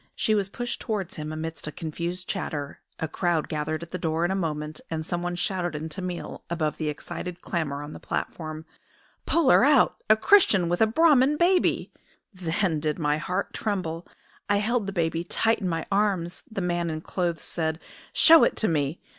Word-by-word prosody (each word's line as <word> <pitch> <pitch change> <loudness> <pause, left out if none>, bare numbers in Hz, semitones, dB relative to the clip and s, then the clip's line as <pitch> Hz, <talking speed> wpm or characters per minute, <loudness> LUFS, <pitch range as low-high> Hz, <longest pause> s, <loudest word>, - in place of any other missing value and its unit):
She 215 - +1
was 200 -2 +1
pushed 240 +4 -4
towards 210 -6 -3
him 155 0 -4
amidst 160 0 -5
a - - -3
confused 170 +4 -5
chatter, 145 -7 -4 0.2
a 160 - -1
crowd 170 -1 0
gathered 155 +1 -2
at 170 - -11
the 185 - -4
door 165 +1 0
in 175 - 0
a - - 0
moment, 155 -4 -3
and 160 -1 -3
someone 175 +1 -2
shouted 175 -2 -2
in 155 +2 -4
Tamil, 180 +2 -5
above 160 -3 -1
the 155 -2 -1
excited 175 +4 -6
clamour 145 -5 -2
on 150 +1 -8
the - - -9
platform: 155 -1 -4 0.6
"Pull 330 -6 +4
her - - +6
out! 280 -1 +5
A 215 - +7
Christian 220 - +5
with 175 +3 0
a 220 - +6
Brahman 290 +2 +4
baby!" 360 +2 +2 0.4
"Then 175 -2 0
did 150 0 -1
my 150 -1 +1
heart 185 +4 -2
tremble! 180 -6 -3 0.4
I 205 - +4
held 215 +1 0
the - - -2
baby 165 -2 0
tight 225 +5 +1
in 185 - -1
my 165 -1 -2
arms. 195 -4 0
The 215 -3 -4
man 175 -1 0
in 155 0 -4
clothes 170 -2 -2
said, 160 -1 -2 0.3
'Show 330 0 +8
it - - +3
to 220 - +1
me!' 150 -1 0
175 Hz, 190 wpm, -26 LUFS, 160-200 Hz, 0.6 s, Show